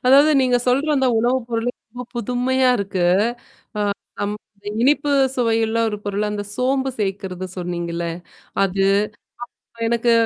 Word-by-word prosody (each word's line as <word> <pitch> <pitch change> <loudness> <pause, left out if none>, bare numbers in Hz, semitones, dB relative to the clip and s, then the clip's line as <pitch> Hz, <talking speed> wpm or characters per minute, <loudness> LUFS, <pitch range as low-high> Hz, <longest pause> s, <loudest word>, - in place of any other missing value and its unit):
அதாவது 280 +4 +7
நீங்க 250 -1 +3
சொல்ற 275 +5 +2
அந்த 265 -1 +2
உணவுப்பொருள் 240 0 0 0.2
ரொம்ப 245 +2 -7
புதுமையா 250 +2 +1
இருக்கு. 190 -2 -1 1.2
அ - - 0
அம் 205 +1 -1 0.5
இனிப்பு 290 +2 +3 0.2
சுவையுல்ல 225 -2 +1
ஒரு 210 - -3
பொருள், 205 +1 -1
அந்த 205 0 -3
சோம்பு 265 +2 +1
சேர்க்கறது 190 -2 -3
சொன்னீங்கல்ல. 170 -1 -3 0.6
அது, 195 0 +1 0.8
அப்புறம் 230 -1 -4
எனக்கு 235 0 +2
230 Hz, 125 wpm, -21 LUFS, 200-255 Hz, 1.2 s, அதாவது